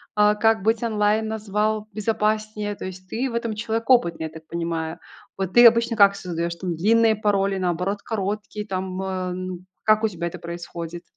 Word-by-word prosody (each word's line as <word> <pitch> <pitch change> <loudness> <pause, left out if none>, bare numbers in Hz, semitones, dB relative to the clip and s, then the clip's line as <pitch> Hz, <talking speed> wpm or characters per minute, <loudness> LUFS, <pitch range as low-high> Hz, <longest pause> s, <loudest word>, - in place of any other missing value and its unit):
а, 210 0 +4
как 225 0 +3
быть 225 +1 +1
онлайн 215 0 +1
назвал 215 0 -1
безопаснее, 215 -1 -1
то - - -7
есть 185 0 -8
ты 255 +3 -1
в - - -5
этом 230 -2 -2
человек 225 +2 -3
опытный, 170 -10 +3
я - - -4
так 160 0 -12
понимаю. 165 0 -3 0.4
Вот 190 -1 -3
ты 240 0 +8
обычно 230 0 +5
как 200 -1 +6
создаешь 170 -2 -3
там 175 -1 -3
длинные 220 +5 +4
пароли, 200 -2 +1
наоборот, 185 +3 -1
короткие 210 0 -3
там, 185 -1 -3
э, - - -3 0.3
н 185 0 -6 0.2
Как 215 0 +4
у - - +4
тебя 170 -2 -4
это - - -6
происходит? 170 0 -7
205 Hz, 185 wpm, -23 LUFS, 180-220 Hz, 0.4 s, ты